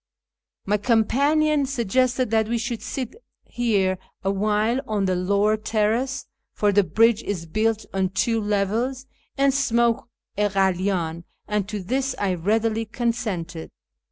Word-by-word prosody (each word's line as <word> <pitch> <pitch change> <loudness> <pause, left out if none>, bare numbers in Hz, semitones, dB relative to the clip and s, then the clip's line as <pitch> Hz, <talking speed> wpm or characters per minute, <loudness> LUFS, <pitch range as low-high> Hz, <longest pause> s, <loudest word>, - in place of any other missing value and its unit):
My 210 +1 +2
companion 280 +7 +2
suggested 255 0 +1
that 220 -1 +2
we 235 - +1
should 235 0 -3
sit 255 -3 -4 0.3
here 200 -6 0 0.2
awhile 210 +5 +1
on 210 -2 0
the 185 -1 +1
lower 200 +4 +2
terrace 220 +5 0 0.3
(for 205 -1 +2
the 205 0 +4
bridge 225 +6 +3
is 180 -7 -4
built 215 +5 0
on 190 -1 +1
two 225 +4 0
levels) 215 +6 -1 0.3
and 275 0 +3
smoke 235 -3 +1 0.3
a 210 0 +3
kalydn, 185 -3 0 0.2
and 210 -1 -1
to 210 -3 -4
this 260 +6 -1
I 195 -2 0
readily 220 +5 0
consented. 215 -8 -3
215 Hz, 130 wpm, -23 LUFS, 195-240 Hz, 0.3 s, the